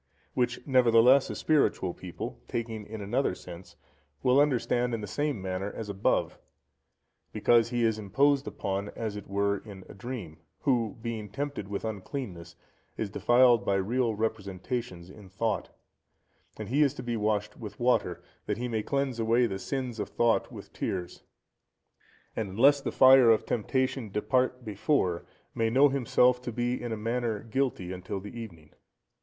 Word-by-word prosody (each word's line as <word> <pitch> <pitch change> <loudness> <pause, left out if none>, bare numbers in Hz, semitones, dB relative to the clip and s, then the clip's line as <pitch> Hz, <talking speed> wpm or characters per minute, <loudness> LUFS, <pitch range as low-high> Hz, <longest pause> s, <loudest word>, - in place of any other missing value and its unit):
Which, 120 -1 -1
nevertheless, 125 0 +5
a - - -4
spiritual 140 - +1
people, 90 -8 -7
taking 115 -3 -4
in 110 0 -7
another 105 +1 0
sense, 90 0 -11 0.5
will 130 +2 +5
understand 125 -3 +1
in 110 - -5
the - - -4
same 145 +6 -2
manner 95 +1 -3
as 110 -2 -7
above; 100 -1 0 0.9
because 115 -1 +3
he 120 -1 0
is 110 -1 +1
imposed 135 +7 +2
upon 100 +1 -3
as 110 -3 -4
it 105 -1 -8
were 100 0 0
in 100 -3 -11
a - - -11
dream, 100 -7 -7 0.2
who, 120 -6 +1
being 110 -3 -4
tempted 140 -2 -4
with 100 +2 -4
uncleanness, 100 - -6 0.4
is 105 -3 -3
defiled 120 0 +4
by 100 - +1
real 115 +4 0
representations 100 -2 -4
in 100 -1 -14
thought, 100 +1 -2 0.9
and 110 -2 -6
he 140 +5 +2
is 145 -2 +3
to - - -7
be 120 -1 -2
washed 105 -1 -1
with 110 -3 -9
water, 125 +1 +1 0.2
that 105 - -1
he 125 +1 -3
may 110 -2 -1
cleanse 140 0 -1
away 115 +2 +3
the 95 -4 -3
sins 125 -1 -4
of 105 - -3
thought 120 -1 +1
with - - -11
tears; 90 -2 -4 1.1
and 110 -3 -2
unless 135 +9 +4
the - - -3
fire 130 -2 +7
of 110 -1 +4
temptation 130 0 -1
depart 125 +5 0
before, 100 - 0 0.3
may 115 0 +1
know 135 +5 +5
himself 125 -1 +3
to 125 - -5
be 120 +2 -1
in 120 - -4
a 110 - -2
manner 115 -1 -2
guilty 115 -6 -2
until 95 +2 -5
the 105 +4 -10
evening. 85 -10 -9
115 Hz, 160 wpm, -29 LUFS, 100-125 Hz, 1.1 s, fire